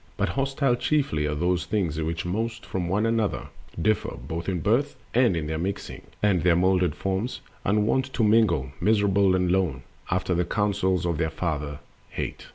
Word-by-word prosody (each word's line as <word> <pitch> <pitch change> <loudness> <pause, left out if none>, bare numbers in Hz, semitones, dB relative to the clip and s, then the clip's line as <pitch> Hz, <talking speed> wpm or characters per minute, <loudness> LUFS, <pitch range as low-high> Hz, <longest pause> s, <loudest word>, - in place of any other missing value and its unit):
But - - +1
hostile 135 -1 +1
chiefly 120 - +1
are 75 - -1
those 90 +3 0
things 85 -7 -1
which 80 +1 -2
most 110 +5 -2
From 90 -2 -3
one 105 +4 +1
another 115 -2 0 0.3
differ, 105 +5 0
both 80 +9 -5
in 90 -2 -1
birth, 120 - +1 0.2
And 120 -7 +4
in 80 - -2
their 80 +1 -2
mixing 95 +3 -4 0.2
and 100 -5 +3
their 85 0 +4
molded 90 -2 +2
forms— 95 +6 -2 0.2
Unwont 110 +6 +1
to 120 - +1
mingle, 105 - +3
miserable 100 -3 +3
and 90 -1 +1
lone, 90 -9 0 0.3
After 90 0 0
the 90 +1 +2
counsels 95 -3 0
of 85 -3 -1
their 80 -1 +1
father, 75 -3 -3 0.3
Hate. - - -5
95 Hz, 170 wpm, -26 LUFS, 85-110 Hz, 0.3 s, And